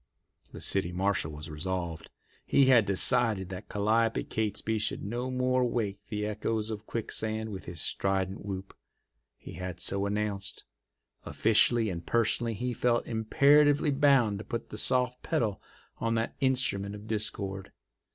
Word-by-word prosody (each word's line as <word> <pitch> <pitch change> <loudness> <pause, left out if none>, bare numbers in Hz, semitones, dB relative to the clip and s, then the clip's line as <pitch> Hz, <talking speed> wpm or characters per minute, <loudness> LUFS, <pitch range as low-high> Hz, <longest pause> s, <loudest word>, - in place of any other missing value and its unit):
The - - -9
city 95 -3 +1
marshal 95 -3 0
was 75 +1 -8
resolved. 85 +1 -4 0.3
He 140 - +4
had 120 -5 +5
decided 105 -1 +3
that 95 -1 -8
Calliope 110 +2 +1
Catesby 110 0 -2
should 110 +1 -2
no 120 +5 -3
more 130 0 +1
wake 105 -4 -2
the 105 -2 -3
echoes 110 +1 -2
of 110 0 -7
Quicksand 110 -1 -3
with 95 -2 -7
his 85 -2 -6
strident 95 0 -1
whoop. 95 -1 -6 0.6
He - - -11
had 90 0 -6
so 100 0 0
announced. 100 -1 -2 0.6
Officially 115 0 +3
and 85 -1 -5
personally 115 0 +1
he 125 +4 -2
felt 120 0 +1
imperatively 145 +6 +4
bound 135 -7 +3
to - - -6
put 115 0 -5
the 105 - -6
soft 125 -1 0
pedal 105 -4 -1 0.4
on 115 0 0
that 115 0 -1
instrument 125 -7 0
of 105 0 -10
discord. 100 -3 -3
110 Hz, 145 wpm, -29 LUFS, 100-120 Hz, 0.6 s, had